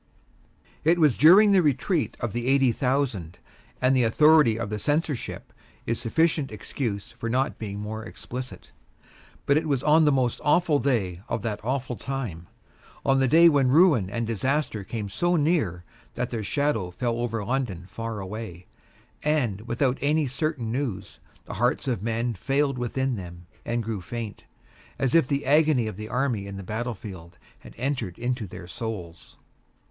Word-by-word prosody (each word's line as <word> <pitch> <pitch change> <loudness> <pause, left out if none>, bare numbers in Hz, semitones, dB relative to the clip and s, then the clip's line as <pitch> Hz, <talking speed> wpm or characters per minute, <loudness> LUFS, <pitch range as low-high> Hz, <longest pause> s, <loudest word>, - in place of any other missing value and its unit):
It 165 +3 +4
was 150 -7 +4
during 195 +7 +7
the 195 -2 +5
Retreat 150 +3 0
of 120 -4 -3
the 120 +1 -3
Eighty 135 -2 +4
Thousand, 125 - -1 0.4
and 130 +1 +3
the 130 - +4
authority 150 0 +5
of 115 -2 -4
the 105 - -2
Censorship 145 +1 -2 0.3
is 115 -1 -1
sufficient 150 +3 +1
excuse 105 -1 -4
for 115 - -5
not 130 +3 0
being 100 -2 -5
more 110 +1 -5
explicit. 125 +3 -8 0.7
But 140 - +4
it 160 +1 0
was 140 -4 0
on 155 +1 +5
the 150 - +5
most 130 -3 0
awful 150 0 +3
day 100 -11 0
of 110 - -2
that 105 -3 -3
awful 125 +1 -2
time, 115 -12 -5 0.6
on 135 0 +3
the 135 - +3
day 165 +6 +7
when 140 -5 +4
ruin 145 - +5
and 115 +3 -2
disaster 115 0 -1
came 105 +1 -5
so 175 - 0
near 145 - +1 0.3
that 125 - -2
their 115 -3 -3
shadow 115 -5 0
fell 115 +6 -2
over 115 -3 -2
London 115 -8 -2
far 115 +1 -5
away; 95 -3 -7 0.6
and, 130 -10 0
without 125 +2 0
any 150 +2 +2
certain 135 -3 -2
news, 115 -8 -4 0.3
the - - -7
hearts 125 +3 +1
of 120 -8 -1
men 115 +2 -1
failed 135 +5 0
within 130 +1 -1
them 85 -2 -9 0.2
and 115 0 -2
grew 110 -3 -4
faint; 115 +3 -6 0.5
as 135 -2 0
if 165 -6 +5
the 140 +1 -1
agony 150 -3 +4
of 110 -3 -4
the 110 +2 -7
army 125 -6 -1
in 100 0 -7
the 100 - -7
battlefield 100 -5 -6 0.2
had - - -14
entered 125 -8 -2
into 120 -2 -2
their 90 - -10
souls. 90 -6 -7
120 Hz, 165 wpm, -26 LUFS, 105-140 Hz, 0.7 s, during